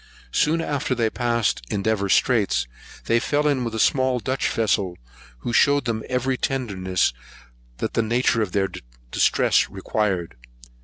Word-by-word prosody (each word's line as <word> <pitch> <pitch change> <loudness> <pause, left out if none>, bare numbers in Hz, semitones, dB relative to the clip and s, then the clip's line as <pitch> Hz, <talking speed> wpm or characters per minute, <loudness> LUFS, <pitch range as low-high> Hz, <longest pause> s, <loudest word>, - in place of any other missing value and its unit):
Soon 160 - +2
after 145 -4 -1
they 120 - -1
had 110 - +1
passed 120 - 0
Endeavour 100 -1 0
Straits, 95 - +2 0.4
they 115 - +3
fell 145 +4 0
in 140 -4 +1
with 115 -2 -4
a - - -2
small 130 +1 +2
Dutch 130 +4 -1
vessel, 100 -5 0 0.4
who 120 - -3
shewed 140 +2 +4
them 115 -2 -1
every 130 +1 0
tenderness 95 - -1 0.6
that - - -3
the - - +2
nature 115 +1 +1
of 105 -4 -1
their 95 0 +1 0.4
distress - - +3
required. 95 -2 -2
115 Hz, 150 wpm, -23 LUFS, 100-130 Hz, 0.6 s, shewed